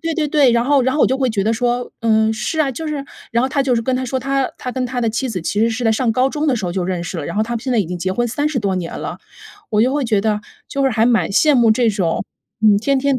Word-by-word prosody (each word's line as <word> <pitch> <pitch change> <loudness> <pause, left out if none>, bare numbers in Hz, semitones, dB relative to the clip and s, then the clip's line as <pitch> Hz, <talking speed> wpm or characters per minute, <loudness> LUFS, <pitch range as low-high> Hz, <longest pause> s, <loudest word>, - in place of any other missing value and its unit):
对 330 -1 -2
对 310 -2 0
对， 285 -4 +4
然 235 0 +2
后 280 +1 +3
然 260 +1 +1
后 305 - +2
我 - - +6
就 265 - 0
会 260 -1 +1
觉 210 -4 -1
得 220 - +2
说， 245 +1 -1
“嗯， 220 -1 +2
是 225 +8 -3
啊。” 295 -3 +2
就 315 +6 -5
是 290 -2 -3 0.3
然 235 +1 +1
后 260 - +1
他 275 +1 0
就 265 -2 +1
是 230 - 0
跟 260 +3 0
她 255 - -1
说 260 +2 -1
他 270 +1 -1
他 250 - -5
跟 255 0 -2
他 245 0 -3
的 230 - +1
妻 245 +4 -2
子 185 -7 -4
其 205 +5 -1
实 225 - +4
是 230 +2 -3
在 225 - +3
上 235 +1 +1
高 255 +3 +2
中 300 +2 -2
的 270 -4 +2
时 215 - -4
候 175 - -2
就 185 0 -1
认 175 -1 -2
识 175 0 -5
了， 145 - -4
然 - - -5
后 215 - +3
他 230 +2 -4
们 230 - -3
现 260 - -4
在 240 - +2
已 205 - +2
经 175 +1 -5
结 185 +2 -2
婚 240 +6 0
30 290 +4 -1
多 200 -4 -1
年 175 -2 -4
了。 - - -5 0.5
我 215 0 +2
就 255 +3 +2
会 290 0 0
觉 225 -5 +1
得， 210 +1 0 0.3
就 275 - -2
是 270 - +4
还 220 -1 +2
蛮 235 -2 +2
羡 295 +9 +4
慕 235 -3 +4
这 230 +1 +3
种， 185 -5 -1 0.4
嗯， 210 -2 +5
天 275 +6 +1
天 275 -1 +1
240 Hz, 345 characters per minute, -18 LUFS, 220-270 Hz, 0.5 s, 我